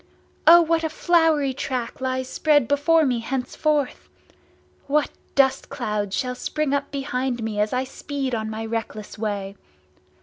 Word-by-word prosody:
O 340 Hz, +1 st, +9 dB
what 330 Hz, 0 st, +1 dB
a 320 Hz, -, 0 dB
flowery 315 Hz, -4 st, +2 dB
track 255 Hz, 0 st, -4 dB
lies 260 Hz, 0 st, -1 dB
spread 290 Hz, -3 st, +2 dB
before 310 Hz, +3 st, +3 dB
me, 250 Hz, -3 st, +1 dB
henceforth! 270 Hz, +4 st, -1 dB, 0.8 s
What 295 Hz, +1 st, +1 dB, 0.2 s
dust 270 Hz, -1 st, +3 dB
clouds 210 Hz, -7 st, -2 dB
shall 250 Hz, -1 st, -1 dB
spring 295 Hz, +3 st, -2 dB
up 280 Hz, 0 st, -1 dB
behind 260 Hz, -3 st, -2 dB
me 215 Hz, -2 st, -3 dB
as 210 Hz, +1 st, +1 dB
I 255 Hz, 0 st, 0 dB
speed 270 Hz, 0 st, -4 dB
on 220 Hz, -1 st, -2 dB
my 220 Hz, +1 st, -4 dB
reckless 220 Hz, -2 st, -5 dB
way! 200 Hz, -2 st, -3 dB
265 Hz, 145 wpm, -23 LUFS, 230-290 Hz, 0.8 s, O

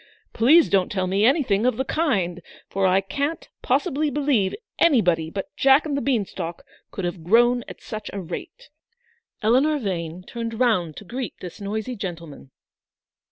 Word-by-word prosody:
Please 300 Hz, +9 st, +5 dB
don't 190 Hz, -2 st, +1 dB
tell 185 Hz, -2 st, 0 dB
me 195 Hz, +3 st, +1 dB
any 275 Hz, +6 st, +4 dB
thing 205 Hz, -3 st, +1 dB
of 250 Hz, -2 st, +2 dB
the 265 Hz, -, -1 dB
kind, 195 Hz, -, 0 dB, 0.3 s
for 195 Hz, 0 st, +1 dB
I 185 Hz, +1 st, +3 dB
can't 285 Hz, -, -3 dB
possibly 305 Hz, -4 st, +1 dB
believe 275 Hz, -9 st, +1 dB, 0.2 s
anybody 180 Hz, -, +3 dB
but 195 Hz, +3 st, -6 dB
Jack 270 Hz, +3 st, +5 dB
and 295 Hz, -2 st, -2 dB
the 280 Hz, -, -1 dB
beanstalk 195 Hz, -10 st, -2 dB, 0.3 s
could 190 Hz, -, -5 dB
have 175 Hz, -1 st, -4 dB
grown 240 Hz, +6 st, +4 dB
at -, -, -10 dB
such 215 Hz, -1 st, -6 dB
a 200 Hz, -, -5 dB
rate." 175 Hz, -2 st, -8 dB, 0.7 s
Eleanor 265 Hz, +8 st, +3 dB
Vane 180 Hz, -, -4 dB
turned 230 Hz, +2 st, -5 dB
round 185 Hz, -11 st, +1 dB
to 210 Hz, -, -9 dB
greet 245 Hz, +4 st, -5 dB
this 180 Hz, +3 st, -9 dB
noisy 215 Hz, +5 st, -3 dB
gentleman. 170 Hz, -, -7 dB
215 Hz, 160 wpm, -23 LUFS, 185-265 Hz, 0.7 s, Please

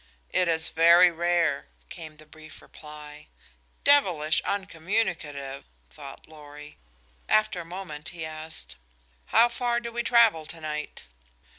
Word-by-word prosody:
"It 180 Hz, -, +2 dB
is 160 Hz, -1 st, +2 dB
very 170 Hz, +2 st, +6 dB
rare," 170 Hz, -3 st, 0 dB, 0.2 s
came 155 Hz, -2 st, -10 dB
the 155 Hz, -, -16 dB
brief 155 Hz, 0 st, -14 dB
reply. 150 Hz, 0 st, -12 dB, 0.6 s
"Devilish 175 Hz, -, +3 dB
uncommunicative," 165 Hz, -8 st, -3 dB, 0.3 s
thought 135 Hz, -, -12 dB
Lorry. 150 Hz, -1 st, -13 dB, 0.5 s
After 215 Hz, -4 st, +2 dB
a -, -, -11 dB
moment 165 Hz, -4 st, -8 dB
he 165 Hz, -2 st, -7 dB
asked: 155 Hz, -, -9 dB, 0.5 s
"How 235 Hz, -, +5 dB
far 240 Hz, 0 st, -1 dB
do 235 Hz, 0 st, -7 dB
we 235 Hz, +1 st, -2 dB
travel 225 Hz, -10 st, +3 dB
tonight?" 155 Hz, -2 st, -6 dB
160 Hz, 120 wpm, -26 LUFS, 150-190 Hz, 0.6 s, very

